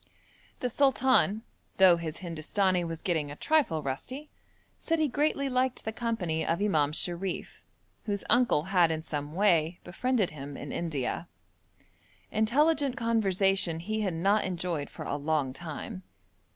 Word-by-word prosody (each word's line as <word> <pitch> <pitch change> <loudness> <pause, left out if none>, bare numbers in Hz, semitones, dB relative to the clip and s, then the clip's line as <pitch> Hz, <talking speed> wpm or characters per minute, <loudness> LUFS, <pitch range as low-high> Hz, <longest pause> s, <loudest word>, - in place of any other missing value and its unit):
The 250 - 0
sultan, 260 -5 +3 0.3
though 185 -3 +7
his 165 0 -6
Hindustani 175 +3 0
was 165 -1 -5
getting 160 -5 0
a 145 - -7
trifle 260 - +1
rusty, 255 - -5 0.5
said 330 - 0
he 310 -1 +2
greatly 285 +1 0
liked 255 -1 0
the 220 - -3
company 205 -10 -1
of 170 - 0
Imam 155 -8 +2
Sharif, 175 +4 -1 0.4
whose 200 -2 -2
uncle 240 -11 +3
had 175 -3 +5
in 160 -1 -2
some 150 0 -5
way 175 -4 +2
befriended 235 +1 0
him 140 -1 -8
in 145 - -7
India. 160 -1 -3 1.0
Intelligent 275 +5 +2
conversation 195 -7 +1
he 215 +5 -2
had 190 -5 -1
not 200 +6 +2
enjoyed 175 -5 -3
for - - -8
a - - -2
long 145 -3 0
time. 175 - -7
185 Hz, 140 wpm, -29 LUFS, 160-230 Hz, 1.0 s, though